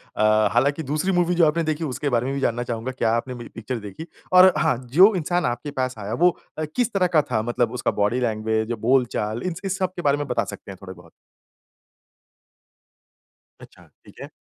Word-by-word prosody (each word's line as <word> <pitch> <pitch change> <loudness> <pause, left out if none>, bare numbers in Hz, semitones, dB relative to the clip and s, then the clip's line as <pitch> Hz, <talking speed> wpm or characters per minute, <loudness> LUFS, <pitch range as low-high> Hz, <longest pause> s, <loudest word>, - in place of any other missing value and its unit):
अ, 110 0 +3
हालाँकि 140 +6 +1
दूसरी 155 +7 -1
मूवी 175 -1 +1
जो 170 - +5
आपने 165 +2 0
देखी 155 0 -2
उसके 145 0 -2
बारे 120 -2 0
में 135 - -2
भी - - -2
जानना 120 -1 0
चाहूँगा 120 +1 -4
क्या 120 -3 0
आपने 125 +2 -3
में 120 - -9
पिक्चर 120 +2 -4
देखी? 105 - -9 0.3
और 185 +1 +8
हाँ, - - +1
जो 185 - +6
इंसान 175 0 0
आपके 120 +4 -3
पास 130 -2 -2
आया 105 +1 -5
वो 175 +7 +3 0.2
अ, 155 - -2
किस 245 -2 0
तरह 185 -2 +2
का 165 -3 +3
था 110 -2 +1
मतलब 120 0 -1
उसका 125 - -1
बॉडी 105 +5 +1
लैंग्वेज 110 -1 -1
बोलचाल 120 -2 0
इन्स 180 -1 -4
इस 190 0 -2
सब 185 -1 -2
के 175 - -5
बारे 145 -2 +2
में 145 - -4
बता 115 -4 0
सकते 100 - -9
हैं 95 - -10
थोड़े 95 -1 -9
बहुत? 85 -2 -17 2.5
अच्छा, - - -16 0.2
ठीक - - -17
है। - - -8
130 Hz, 210 wpm, -23 LUFS, 115-165 Hz, 2.5 s, और